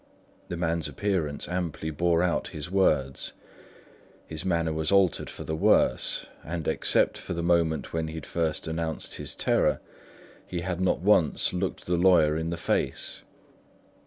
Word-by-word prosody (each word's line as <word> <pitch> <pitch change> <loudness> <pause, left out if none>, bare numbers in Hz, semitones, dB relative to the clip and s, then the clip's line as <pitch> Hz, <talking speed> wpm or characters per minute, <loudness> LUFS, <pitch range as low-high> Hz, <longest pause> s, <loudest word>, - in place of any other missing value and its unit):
The 85 - -4
man's 85 -1 0
appearance 80 -1 -2
amply 85 -3 -3
bore 85 +2 +2
out 90 -2 0
his 75 +3 -7
words; 75 -9 +1 0.9
his 80 0 -4
manner 85 -3 0
was 80 +1 -1
altered 100 -3 +3
for - - -8
the 80 - -3
worse; - - +3 0.2
and 85 0 -4
except 80 - +2
for - - -5
the 85 -1 -3
moment 85 -2 +1
when 80 -1 -1
he 80 - -6
had 80 -3 -6
first 80 -2 -2
announced 80 0 -3
his - - -7
terror, - - +2 0.7
he 90 -2 -3
had 90 0 -3
not 95 - +1
once 90 -5 +3
looked 90 +1 -3
the 90 0 +1
lawyer 85 -4 +5
in 80 +1 -2
the 85 - -3
face. - - -1
85 Hz, 160 wpm, -27 LUFS, 80-90 Hz, 0.9 s, lawyer